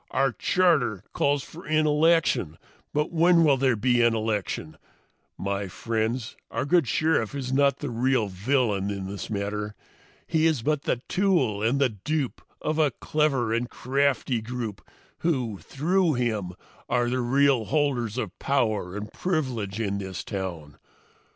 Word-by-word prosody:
Our 135 0 +2
charter 140 - +2
calls 140 -1 +1
for 170 +3 -11
an 155 0 +2
election 150 - +2 0.3
but 150 +1 0
when 170 0 +5
will 145 -3 +5
there 130 -2 +2
be 120 +2 +2
an 120 -1 +4
election? 105 -8 -2 0.6
My 100 0 -2
friends, 110 +4 -2
our 115 +4 -2
good 170 -2 +3
Sheriff 145 -3 +1
is 130 -2 -3
not 140 0 +3
the 145 -4 -4
real 120 -1 +1
villain 100 0 0
in 100 -1 -4
this 100 +1 -6
matter. 105 0 -3 0.5
He 160 -1 +2
is 150 -8 0
but 150 0 0
the 120 - -1
tool 170 - +1
and 120 +6 +2
the 140 -2 +3
dupe 130 +7 -3 0.2
of 155 +1 0
a 155 -2 +4
clever 135 -3 0
and 120 +1 -1
crafty 135 -2 0
group 115 -3 -5 0.4
who, 125 - -1
through 165 - +1
him, 110 -7 -1 0.4
are 120 0 +2
the 125 +1 0
real 135 -1 +3
holders 125 -5 0
of 105 -6 -4
power 110 -8 0
and 105 +1 -7
privilege 125 - -2
in 100 -3 -1
this 95 -3 -5
town. 90 -8 -6
125 Hz, 150 wpm, -26 LUFS, 105-145 Hz, 0.6 s, when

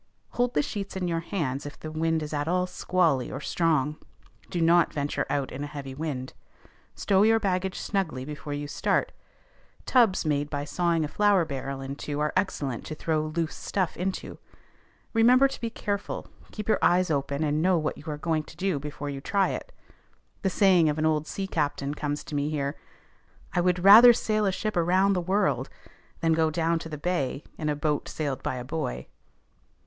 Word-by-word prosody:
_ - - -21
Hold 245 0 +1
the 150 - +3
sheets 200 +3 -5
in 185 -1 -2
your 165 -1 0
hands 150 -6 -3
if 145 - -10
the 155 - -7
wind 160 0 0
is 150 - -6
at 145 0 -1
all 180 +1 +1
squally 180 -6 +1
or 135 - -4
strong. 150 -2 0 0.5
Do 175 - -2
not 170 0 +4
venture 145 0 -2
out 140 -2 -1
in 135 +3 -5
a - - -4
heavy 140 -2 -7
wind. 135 -3 -4 0.6
Stow 195 -1 +2
your 225 +1 +5
baggage 190 -2 -1
snugly 165 -10 -2
before 145 0 -6
you 145 0 -4
start: - - 0 0.7
tubs 230 -9 +3
made 145 -1 0
by 145 -1 -3
sawing 170 0 +1
a - - -3
flour 200 +1 +3
barrel 135 -1 -5
in 135 +1 -5
two 145 0 -4
are 150 0 0
excellent 145 - -1
to 155 - -5
throw 155 0 -1
loose 160 +1 -2
stuff 185 -3 -2
into. 185 +2 -4 0.7
Remember 250 +4 +6
to 270 - -8
be 230 - -2
careful; 205 -2 -4 0.3
keep 210 - -6
your 220 - +3
eyes 180 -1 +3
open, 140 +1 -1
and 150 0 +1
know 180 +1 +3
what 155 -1 -1
you - - -13
are 150 -1 -3
going 160 0 0
to 155 - -14
do 185 -5 0
before 145 0 -5
you 135 -1 -6
try 195 +6 +1
it. - - -5 0.7
The 190 - +1
saying 185 -4 +4
of 150 - -1
an 155 - +1
old 155 -1 +1
sea 195 - -3
captain 145 -5 -1
comes 145 0 -3
to - - -10
me 145 0 0
here: 140 -2 -2 0.8
"I 175 - +2
would 180 0 +1
rather 225 +5 +10
sail 215 -2 0
a - - +2
ship 215 +3 -3
around 185 +3 +3
the 180 - 0
world, 190 +4 0 0.5
than 165 -1 +2
to - - +4
go 160 -1 +3
down 165 +1 0
the 160 -2 -6
bay 150 -4 -2 0.2
in 150 - -1
a 150 - 0
boat 150 0 -1
sailed 145 -4 -3
by - - -2
a 125 -1 -6
boy." 95 - -3
160 Hz, 200 wpm, -27 LUFS, 145-185 Hz, 0.8 s, rather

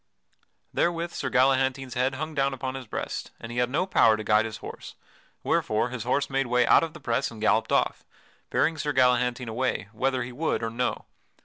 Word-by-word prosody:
Therewith 170 0 0
Sir - - -3
Galahantine's 130 0 +2
head 130 +2 0
hung 155 +3 -4
down 135 -2 +1
upon 130 0 -4
his 130 -3 -7
breast - - -4
and 115 - -8
he 120 - -2
had 125 0 +2
no 160 +8 0
power 115 - +4
to 110 - -5
guide 105 +1 +3
his 110 -1 -5
horse, - - -9 0.5
wherefore 110 +3 +1
his 120 -3 -5
horse 135 +3 +1
made 135 -1 0
way 125 0 +3
out - - +6
of 165 -2 -3
the - - -10
press 120 +3 -1
and 115 - -11
galloped 110 0 +2
off, - - +1 0.5
bearing 160 -1 +1
Sir 145 0 -1
Galahantine 125 -1 +2
away, 115 -3 -2
whether 130 +3 0
he 120 - -7
would 145 -1 -1
or 115 - -2
no. 125 +1 -2
125 Hz, 205 wpm, -26 LUFS, 120-135 Hz, 0.5 s, out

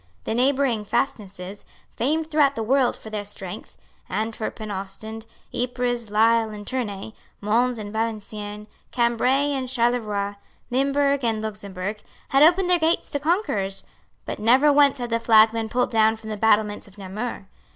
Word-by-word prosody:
The - - -2
neighbouring 255 -2 +2
fastnesses, 200 -5 -3 0.3
famed 315 +6 0
throughout 290 -2 +3
the 225 - -2
world 255 +2 +2
for 220 - -11
their 210 -1 -3
strength, 200 -3 -8 0.3
Antwerp 220 +3 -3
and 215 -1 -5
Ostend, 215 +3 -6 0.3
Ypres, 245 -2 -2
Lisle 225 +1 +3
and 210 -1 -8
Tournay, 220 -5 -4 0.3
Mons 235 +4 +1
and 205 -1 -7
Valenciennes, 210 -2 -4 0.2
Cambray 250 +4 +2
and 265 -2 -2
Charleroi, 220 -5 0 0.3
Limburg 280 +1 +2
and 225 -2 +1
Luxemburg, 205 -1 -5 0.3
had 275 - +3
opened 355 +4 +6
their 355 -1 +3
gates 325 +1 +1
to 285 - 0
conquerors; 275 - 0 0.4
but - - -5
never 260 +7 +5
once 285 -1 +5
had 240 -2 -4
the 230 - +2
flag 220 -1 +6
been 225 -1 -3
pulled 250 +2 0
down 220 -1 +4
from 220 0 -9
the - - -2
battlements 210 -1 +2
of 200 +1 -18
Namur. 205 +2 -5
225 Hz, 155 wpm, -24 LUFS, 210-260 Hz, 0.4 s, opened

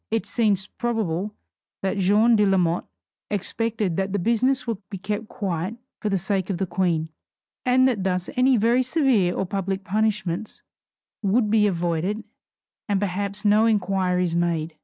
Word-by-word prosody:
It 225 0 -1
seems 205 -5 +1
probable 210 -4 -2 0.5
that 195 +1 0
Jeanne 210 +5 +4
de 210 - +4
Lamotte 180 -4 +2 0.4
expected 210 -2 -1
that 195 0 -1
the - - +1
business 250 +6 +1
would 230 -5 -3
be 200 - -5
kept 210 +3 -4
quiet 190 -2 -3 0.2
for 210 - -2
the 195 - +1
sake 190 +1 -1
of 190 - -1
the 190 - -1
Queen, 170 -3 0 0.6
and 255 +1 +5
that 225 -7 0
thus 180 -1 -1
any 255 0 +4
very 235 +4 +3
severe 255 - +2
or 190 - -1
public 195 0 -3
punishments 215 -1 -1 0.6
would 210 +1 +2
be 215 -1 +4
avoided 175 +3 -1 0.7
and 200 -1 +2
perhaps 200 +2 -3
no 210 +2 +5
inquiries 185 -4 +1
made. 170 -2 -1
200 Hz, 155 wpm, -24 LUFS, 180-220 Hz, 0.7 s, and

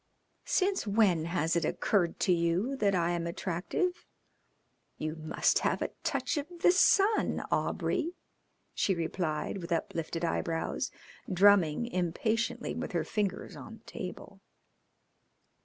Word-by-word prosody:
"Since 380 - +1
when 200 -6 +3
has 170 -1 0
it 170 - +1
occurred 175 +2 +1
to 185 - +4
you 175 +10 +1
that 200 -5 +2
I 170 -1 +1
am 170 -1 -1
attractive? 195 - -2 0.9
You 155 +1 -3
must 155 -1 +1
have - - 0
a - - -3
touch - - -1
of 290 +1 -2
the 355 - +6
sun, 395 +3 +3
Aubrey," 345 +1 0 0.6
she 195 - +1
replied, 165 +1 -2
with 170 0 -8
uplifted 165 0 -2
eyebrows, 165 0 -1 0.4
drumming 190 -1 +5
impatiently 220 +3 -1
with - - -5
her - - +1
fingers 205 -3 -2
on - - -10
the - - -26
table. - - -8
180 Hz, 125 wpm, -30 LUFS, 170-225 Hz, 0.9 s, the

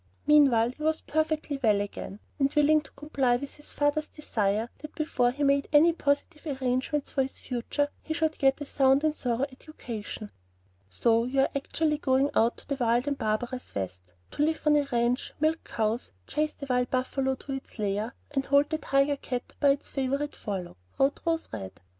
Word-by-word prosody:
Meanwhile, 270 -6 +5
he 285 - -16
was 315 +1 +1
perfectly 310 -2 -1
well 210 -5 +4
again, 205 0 -5 0.2
and 275 0 +3
willing 300 +1 +5
to 280 - -16
comply 275 -4 +1
with 275 +3 -4
his 295 - -12
father's 290 +1 +1
desire 220 -6 -1
that 305 0 -10
before 255 -6 +1
he 280 +4 -3
made 280 0 +3
any 315 +3 +6
positive 290 -1 -1
arrangements 260 +3 -1
for 270 - +1
his 265 0 -3
future, 255 +4 -1
he - - -8
should 315 -1 0
get 270 0 +3
a 290 - -5
sound 270 0 +3
and 310 -1 +2
thorough 250 0 0
education. 235 -7 -8 0.6
"So 230 - +2
you 270 +2 +2
are - - +3
actually 300 +2 0
going 270 0 +2
out 230 +2 +3
to - - -15
the 280 - -2
wild 240 +3 +2
and 285 - +1
barbarous 240 +4 -2
West, 90 -2 -5 0.2
to - - -3
live 315 +1 0
on 300 0 +5
a 290 -1 +2
ranch, 240 +1 0
milk 315 +2 +1
cows, 225 +2 -2
chase 305 0 -1
the 280 - -8
wild 250 -1 +1
buffalo 265 +1 0
to 275 - -9
its 270 -2 -6
lair, 210 +3 -1 0.2
and 270 -2 0
hold 280 +1 +3
the 315 - 0
tiger 275 0 +2
cat 250 -2 -5
by 285 - +5
its 275 +1 +1
favorite 275 +2 -1
forelock," 185 - -5 0.2
wrote 275 +1 +2
Rose 325 -1 +1
Red. 95 -3 -7
275 Hz, 190 wpm, -28 LUFS, 240-295 Hz, 0.6 s, any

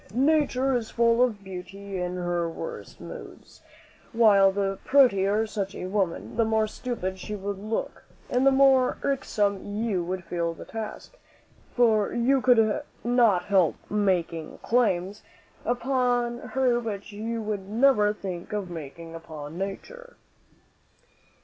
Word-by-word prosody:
"Nature 270 -1 +2
is 230 -2 -2
full 235 0 +3
of 220 -5 +1
beauty 190 +1 -7
in 180 0 -3
her 175 -1 -1
worst 465 - -8
moods; - - -11 0.5
while 205 -4 +6
the 195 0 -2
prettier 215 -6 +4
such 200 -2 -4
a - - -5
woman, 190 +1 -2
the 230 - +4
more 220 0 +2
stupid 210 -5 -4
she 210 +3 -5
would 200 -1 -4
look, 215 +2 -4 0.2
and 250 +1 +1
the 275 - +6
more 265 -1 +4
irksome 205 -7 0
you 205 -3 -2
would 185 +1 -4
feel 170 -2 -2
the - - -10
task; 225 - -7 0.6
for 220 -4 +3
you 255 +3 +2
could 225 0 +4 0.2
not 235 -7 +3
help 190 -5 +3 0.2
making 180 -6 0
claims 205 -4 +1 0.4
upon 245 -1 0
her 255 -2 +1
which 210 -3 -5
you 225 +3 -4
would 210 -3 -4
never 220 -2 +4
think 185 -4 -6
of 200 -4 -3
making 165 +1 -8
upon 160 -2 -8
Nature." 480 - -6
210 Hz, 135 wpm, -26 LUFS, 190-245 Hz, 0.6 s, while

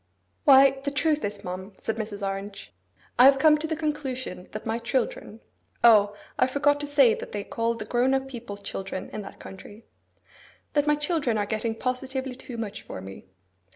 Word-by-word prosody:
'Why, 270 -1 +7
the 285 - 0
truth 300 +2 +1
is, 205 0 -4
ma'am,' 185 +2 -6
said 225 - -3
Mrs. 210 -2 -4
Orange, 195 +1 -6 0.5
'I 250 - +9
have 270 0 +7
come 305 +2 +6
to 320 - -3
the 320 - -1
conclusion 270 - -4
that 215 - -7
my 225 +1 -1
children,'—O, 225 -3 +1 0.2
I - - +5
forgot 285 +2 +2
to 290 - -4
say 280 -5 +5
that - - -7
they 205 -1 -3
call 230 +3 -1
the - - -6
grown 250 +2 +2
up 265 0 -1
people 240 -6 -8
children 195 -1 -6
in 215 - -4
that 195 - -11
country!—'that 220 +8 -8
my 300 - +4
children 295 -6 0
are 205 - 0
getting 220 +2 -2
positively 260 +2 -3
too 250 -1 -9
much 215 -2 -5
for - - -8
me. 95 +1 -10
240 Hz, 180 wpm, -26 LUFS, 205-275 Hz, 0.5 s, I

